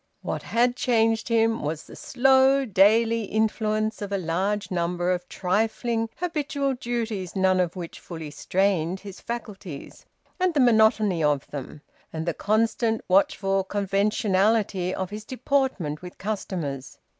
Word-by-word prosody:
What - - -3
had 245 +2 +1
changed 225 -3 +1
him 225 -1 +2
was 155 +1 -3
the - - -13
slow 265 +1 +3
daily 225 +2 +3
influence 215 0 0
of 200 -1 -5
a 200 - +1
large 190 +4 -1
number 175 0 0
of 180 0 -3
trifling 225 +4 -1
habitual 290 -5 -1
duties 230 -7 -3
none 190 -1 +3
of 180 -1 0
which 175 -3 -7
fully 160 -4 -8
strained 185 +1 0
his 200 -2 -10
faculties, 205 -9 -7 0.3
and 365 -2 +1
the - - +3
monotony 220 - +4
of 145 -2 +1
them, 145 +1 -7 0.3
and 160 0 -4
the 170 - 0
constant 225 +3 +1
watchful 195 +1 +2
conventionality 200 0 +1
of 190 0 -4
his 210 +1 -6
deportment 255 - -1
with 180 0 -10
customers. 175 -10 -4
205 Hz, 135 wpm, -25 LUFS, 180-225 Hz, 0.3 s, monotony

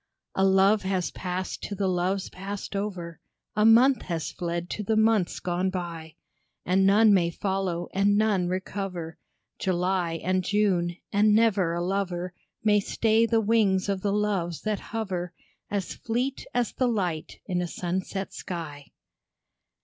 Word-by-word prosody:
A 190 - +1
love 195 +2 +5
has 190 -2 -1
passed 185 0 -4
to 205 - -4
the 195 0 0
loves 185 +1 -1
passed 200 +2 -6
over, 185 -5 -4 0.4
A 210 - +3
month 240 +4 +6
has 165 -3 -3
fled 170 0 -3
to - - -3
the 220 +2 +1
months 220 -4 +2
gone 180 +1 -1
by; 170 -4 -5 0.5
And 190 +2 +3
none 210 +2 +6
may 175 -3 +3
follow, 185 -1 -2
and 200 +1 +3
none 205 -4 +2
recover 185 -2 -4 0.4
July 180 -1 0
and 185 +1 +1
June, 185 -4 +1 0.2
and 210 +1 +4
never 205 -6 +3
a 170 - -1
lover 185 -1 -2 0.3
May 210 -1 +4
stay 225 +2 +2
the 225 -1 +2
wings 205 -3 +2
of 195 -1 -1
the 200 - 0
Loves 200 -5 -1
that 215 -1 -1
hover, 185 -6 -3 0.4
As 200 -3 -2
fleet 250 +4 -3
as 240 -2 0
the 255 - +1
light 180 -9 -2
in 180 -2 -1
a 175 - -2
sunset 185 +3 -3
sky. 150 -5 -6
190 Hz, 150 wpm, -27 LUFS, 175-210 Hz, 0.5 s, month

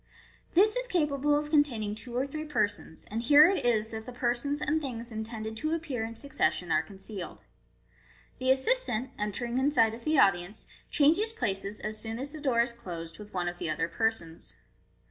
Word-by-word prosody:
This 425 +5 +5
is - - -1
capable 295 - +2
of 300 0 -3
con 295 -2 +7
taining 215 -7 -4
two 240 +2 -7
or 260 - +1
three 305 +2 -5
persons, 205 - -2
and 225 +2 -1
here 290 +6 +8
it 385 +1 0
is 220 -2 +2
that 220 +1 -6
the - - -5
persons 245 +4 -1
and 315 +2 0
things 240 -4 -5
intended 220 0 -5
to 310 +6 0
appear 290 -8 -3
in 225 +1 -5
succession 225 - 0
are - - +4
concealed. 195 -2 -8 1.0
The 255 0 0
assistant, 265 - +2
entering 235 +4 -1
in 270 +2 +3
sight 225 -7 +4
of 230 +1 -9
the 310 0 +2
audience, 190 -1 +2 0.2
changes 335 +9 +3
places, 200 - -2
as 215 0 -4
soon 225 0 -3
as 275 +3 -5
the 310 -1 -9
door 255 -5 +3
is 235 +1 0
closed, 170 -7 -8
with 210 -1 -11
one 175 -1 0
of 175 0 -4
the - - -2
other 165 +1 0
persons. 170 -4 -2
240 Hz, 195 wpm, -29 LUFS, 215-290 Hz, 1.0 s, here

